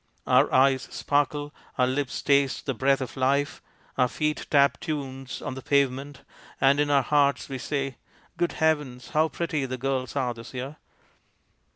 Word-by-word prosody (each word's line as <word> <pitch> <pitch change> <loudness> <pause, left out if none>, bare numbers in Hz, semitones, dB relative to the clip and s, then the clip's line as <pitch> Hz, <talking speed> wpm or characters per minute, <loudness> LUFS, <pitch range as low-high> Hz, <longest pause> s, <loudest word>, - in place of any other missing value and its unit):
Our - - +4
eyes 130 0 +3
sparkle, 145 +1 -1 0.2
our 125 - +4
lips 130 +1 -2
taste 140 -3 +2
the 135 - -1
breath 135 +3 +2
of 130 - -5
life, 140 +3 0 0.4
our 125 - +5
feet 150 +4 -2
tap 140 -1 +4
tunes 135 -4 -5
on - - -3
the 130 - -7
pavement, 140 +1 0 0.4
and 135 +1 +4
in 145 0 +2
our 140 -2 +4
hearts 140 -1 +2
we 135 -1 -4
say, 135 -1 -3 0.2
" - - -32
Good 175 - +1
heavens! 145 -7 0
how 160 0 +2
pretty 155 -5 -2
the 130 0 -4
girls 130 0 -2
are 130 -3 0
this 115 +2 -11
year 135 +4 -5
140 Hz, 170 wpm, -26 LUFS, 130-145 Hz, 0.4 s, our